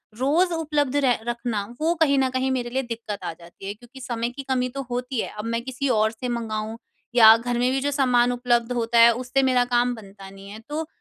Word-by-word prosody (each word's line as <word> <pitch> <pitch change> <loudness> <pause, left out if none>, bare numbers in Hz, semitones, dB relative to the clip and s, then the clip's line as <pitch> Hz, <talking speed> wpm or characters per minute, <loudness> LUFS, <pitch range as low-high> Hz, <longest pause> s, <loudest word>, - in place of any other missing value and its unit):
रोज़ 320 +8 +2
उपलब्ध 295 -4 -1
रह 260 -4 +2
रखना। 235 -4 -2 0.2
वो 330 +2 +2
कहीं 280 -3 +4
न 265 -1 +2
कहीं 260 0 0
मेरे 245 -2 -2
लिए 265 +2 -1
दिक्कत 225 -4 -6
आ - - -3
जाती 170 +3 -13
है। 200 - -3
क्योंकि 245 +4 -15
समय 235 -2 -2
की 275 +3 -8
कमी 255 -1 +1
तो 275 +2 -5
होती 250 +1 -3
है, - - -2
अब 210 - -5
मैं 230 0 -1
किसी 260 +2 -3
और 220 -2 +2
से 240 +3 -6
मँगवाऊ 225 -1 -3 0.4
या 220 -2 +9
घर 240 +1 -3
में 250 - +2
भी 270 - 0
जो 285 - 0
सामान 250 -3 +3
उपलब्ध 240 -1 0
होता 235 0 +1
है। 235 0 +8
उससे 255 +2 0
मेरा 255 -1 +3
काम 245 0 +1
बनता 195 -2 -12
नहीं 195 0 -13
है। 215 +2 -9
तो 310 +1 -3
245 Hz, 235 wpm, -24 LUFS, 230-265 Hz, 0.4 s, या